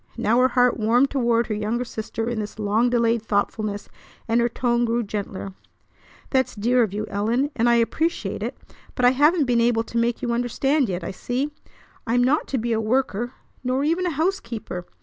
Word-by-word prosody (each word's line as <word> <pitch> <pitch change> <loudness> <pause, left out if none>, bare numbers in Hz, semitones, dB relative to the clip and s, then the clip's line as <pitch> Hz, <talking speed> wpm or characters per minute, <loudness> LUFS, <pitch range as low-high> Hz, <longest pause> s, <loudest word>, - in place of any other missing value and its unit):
Now 230 +3 +2
her 255 - +5
heart 250 -1 +3
warmed 240 +5 +3
toward 235 -3 +2
her 215 - -3
younger 215 +4 -2
sister 225 0 -4
in 235 -2 -2
this 210 0 -5
long 215 +3 +2
delayed 235 -1 +2
thoughtfulness, 205 -1 -2 0.4
and 230 +1 +2
her 235 - +2
tone 240 0 0
grew 235 0 +1
gentler. 200 -2 -5 0.8
"That's 260 -1 +1
dear 240 +4 +2
of 220 -5 +1
you, 210 +2 -3
Ellen, 230 +8 0
and 235 +1 +2
I 235 - +5
appreciate 315 +8 0
it; - - -4 0.4
but 250 - +1
I 245 - +7
haven't 295 +4 +3
been 240 -2 +2
able 230 -1 +2
to 230 +1 -3
make 235 0 0
you 240 -1 0
understand 250 +3 +1
yet, 180 -1 -3
I 170 - -4
see. 250 +9 -3 0.6
I'm 245 +2 +3
not 280 +5 +2
to 270 - -1
be 235 0 -1
a 220 - 0
worker, 240 0 0 0.3
nor 255 +2 0
even 335 +4 +1
a 320 -5 -3
housekeeper. 230 - -3
235 Hz, 195 wpm, -23 LUFS, 220-255 Hz, 0.8 s, I